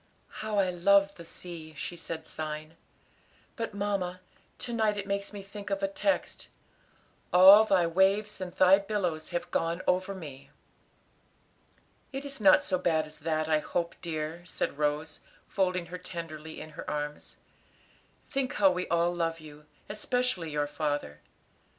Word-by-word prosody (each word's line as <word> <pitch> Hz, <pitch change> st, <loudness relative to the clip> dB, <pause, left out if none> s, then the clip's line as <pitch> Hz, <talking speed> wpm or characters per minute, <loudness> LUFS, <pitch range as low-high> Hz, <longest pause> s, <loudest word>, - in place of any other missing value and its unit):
"How 215 Hz, -1 st, -2 dB
I 190 Hz, -2 st, +3 dB
love 200 Hz, +3 st, +4 dB
the 170 Hz, -, -11 dB
sea," 165 Hz, -2 st, -9 dB
she 175 Hz, -, -5 dB
said, 165 Hz, -1 st, -6 dB
sighing, 155 Hz, +1 st, -5 dB, 0.8 s
"but, 225 Hz, -4 st, -4 dB
mamma, 195 Hz, -3 st, -1 dB, 0.4 s
to 240 Hz, -, -4 dB
night 215 Hz, -2 st, +2 dB
it 200 Hz, -, -3 dB
makes 200 Hz, 0 st, -2 dB
me 205 Hz, -2 st, -7 dB
think 200 Hz, +1 st, -8 dB
of 195 Hz, 0 st, -2 dB
a -, -, +3 dB
text 290 Hz, +9 st, -1 dB, 0.8 s
'All 195 Hz, +4 st, +9 dB
Thy 190 Hz, -5 st, +3 dB
waves 195 Hz, +4 st, +2 dB
and 180 Hz, -1 st, -4 dB
Thy 185 Hz, +2 st, +6 dB
billows 185 Hz, -6 st, -2 dB
have 175 Hz, -, -3 dB
gone 165 Hz, +2 st, 0 dB
over 185 Hz, +2 st, +1 dB
me.'" 140 Hz, -6 st, -9 dB, 1.6 s
"It 275 Hz, +1 st, -5 dB
is 275 Hz, -4 st, -4 dB
not 195 Hz, -2 st, +7 dB
so 185 Hz, -, 0 dB
bad 160 Hz, -3 st, +2 dB
as 155 Hz, 0 st, -11 dB
that, 155 Hz, 0 st, -1 dB
I 155 Hz, -1 st, +3 dB
hope, 170 Hz, +2 st, -2 dB
dear," 160 Hz, 0 st, -4 dB
said 175 Hz, -4 st, -3 dB
Rose, 150 Hz, +1 st, -1 dB, 0.3 s
folding 185 Hz, -2 st, 0 dB
her 180 Hz, +2 st, -7 dB
tenderly 160 Hz, -3 st, -7 dB
in 155 Hz, -, -9 dB
her -, -, -7 dB
arms; 150 Hz, 0 st, -4 dB, 0.9 s
"think 270 Hz, 0 st, -1 dB
how 195 Hz, -2 st, +5 dB
we 180 Hz, 0 st, -2 dB
all 170 Hz, +1 st, +2 dB
love 165 Hz, -1 st, -1 dB
you, 150 Hz, -1 st, -13 dB, 0.2 s
especially 215 Hz, -4 st, -1 dB
your 150 Hz, -1 st, 0 dB
father. 145 Hz, -, -3 dB
180 Hz, 155 wpm, -29 LUFS, 155-200 Hz, 1.6 s, All